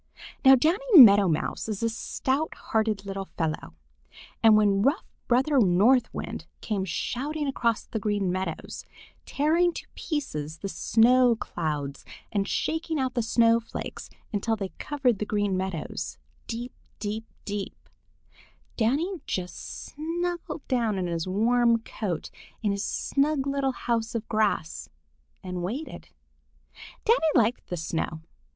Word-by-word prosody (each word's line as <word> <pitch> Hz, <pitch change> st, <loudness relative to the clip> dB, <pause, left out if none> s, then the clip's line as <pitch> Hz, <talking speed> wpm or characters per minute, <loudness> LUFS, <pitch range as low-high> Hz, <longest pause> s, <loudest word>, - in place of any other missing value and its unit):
Now 265 Hz, -1 st, +9 dB
Danny 360 Hz, -, +3 dB
Meadow 205 Hz, -5 st, +9 dB
Mouse 160 Hz, +6 st, -1 dB
is 215 Hz, +1 st, -3 dB
a -, -, +3 dB
stout 265 Hz, +6 st, -2 dB
hearted 215 Hz, -2 st, -1 dB
little 195 Hz, -1 st, -5 dB
fellow, 155 Hz, -, -3 dB, 0.7 s
and 220 Hz, -1 st, +7 dB
when 200 Hz, -2 st, +3 dB
rough 275 Hz, -, +2 dB, 0.2 s
Brother 265 Hz, +3 st, +3 dB
North 220 Hz, +6 st, +4 dB
Wind -, -, -6 dB
came 200 Hz, -3 st, -2 dB
shouting 285 Hz, -, -2 dB
across 235 Hz, -4 st, 0 dB
the 220 Hz, -, -4 dB
Green 205 Hz, -3 st, 0 dB
Meadows, 185 Hz, -3 st, -4 dB, 0.4 s
tearing 330 Hz, +5 st, +2 dB
to -, -, -7 dB
pieces 160 Hz, -, -4 dB
the 195 Hz, -, -5 dB
snow 245 Hz, +4 st, +4 dB
clouds 150 Hz, -9 st, -4 dB, 0.3 s
and 200 Hz, -2 st, 0 dB
shaking 320 Hz, -1 st, -1 dB
out 260 Hz, -1 st, -1 dB
the 240 Hz, -, 0 dB
snowflakes 230 Hz, 0 st, 0 dB, 0.2 s
until 225 Hz, +2 st, 0 dB
they 195 Hz, -3 st, -4 dB
covered 265 Hz, -8 st, 0 dB
the 210 Hz, -, -1 dB
Green 205 Hz, -2 st, 0 dB
Meadows 185 Hz, -4 st, -4 dB, 0.3 s
deep, 240 Hz, +1 st, -5 dB, 0.2 s
deep, 215 Hz, +1 st, -4 dB, 0.2 s
deep, 205 Hz, -1 st, -5 dB, 0.9 s
Danny 300 Hz, -, 0 dB
just 180 Hz, -2 st, -5 dB
snuggled 335 Hz, +1 st, -4 dB
down 230 Hz, -5 st, +1 dB
in 185 Hz, -, -1 dB
his 170 Hz, 0 st, -2 dB
warm 235 Hz, +4 st, +3 dB
coat 205 Hz, -6 st, -5 dB, 0.3 s
in 205 Hz, -, +2 dB
his 200 Hz, 0 st, -2 dB
snug 280 Hz, 0 st, 0 dB
little 275 Hz, -1 st, 0 dB
house 230 Hz, -2 st, -2 dB
of 225 Hz, -1 st, -3 dB
grass 210 Hz, -7 st, -1 dB, 0.5 s
and 180 Hz, -1 st, -4 dB
waited. 240 Hz, -, -5 dB, 1.0 s
Danny 460 Hz, +3 st, +5 dB, 0.2 s
liked 235 Hz, 0 st, +2 dB
the 180 Hz, -, -4 dB
snow. 160 Hz, 0 st, -3 dB
225 Hz, 130 wpm, -27 LUFS, 195-265 Hz, 1.0 s, Now